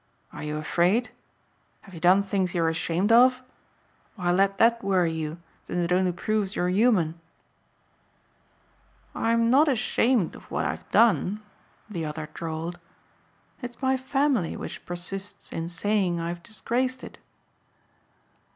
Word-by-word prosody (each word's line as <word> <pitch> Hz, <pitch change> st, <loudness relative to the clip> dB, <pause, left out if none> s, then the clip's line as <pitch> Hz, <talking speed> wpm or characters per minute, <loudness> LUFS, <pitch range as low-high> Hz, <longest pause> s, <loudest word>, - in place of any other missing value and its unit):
Are -, -, -8 dB
you 150 Hz, 0 st, -3 dB
afraid? 180 Hz, +9 st, +1 dB, 0.7 s
Have 195 Hz, -, -16 dB
you 165 Hz, -, -8 dB
done 185 Hz, +4 st, +5 dB
things 190 Hz, -2 st, -1 dB
you're 165 Hz, -1 st, +2 dB
ashamed 170 Hz, +5 st, 0 dB
of? 255 Hz, +2 st, +5 dB, 0.7 s
Why 180 Hz, -4 st, 0 dB
let 195 Hz, +2 st, +2 dB
that 230 Hz, 0 st, +3 dB
worry 185 Hz, -4 st, +2 dB
you 160 Hz, 0 st, -4 dB, 0.3 s
since -, -, -5 dB
it 175 Hz, 0 st, 0 dB
only 180 Hz, 0 st, +3 dB
proves 205 Hz, +2 st, -1 dB
you're 180 Hz, -, 0 dB
human." 180 Hz, -6 st, +2 dB, 1.9 s
"I'm 230 Hz, 0 st, +2 dB
not 290 Hz, +5 st, +5 dB
ashamed 240 Hz, -, +1 dB
of -, -, -14 dB
what -, -, -1 dB
I've -, -, -4 dB
done," 215 Hz, -3 st, +3 dB, 0.5 s
the 180 Hz, -6 st, -4 dB
other 150 Hz, 0 st, -5 dB
drawled, 165 Hz, +2 st, -5 dB, 0.8 s
"it's 245 Hz, -1 st, -7 dB
my 265 Hz, 0 st, +2 dB
family 265 Hz, -, 0 dB
which -, -, -8 dB
persists 190 Hz, +3 st, -6 dB
in 165 Hz, 0 st, -3 dB
saying 180 Hz, 0 st, 0 dB
I've 170 Hz, +1 st, -4 dB
disgraced 250 Hz, +5 st, -2 dB
it." -, -, -10 dB
190 Hz, 135 wpm, -26 LUFS, 170-230 Hz, 1.9 s, done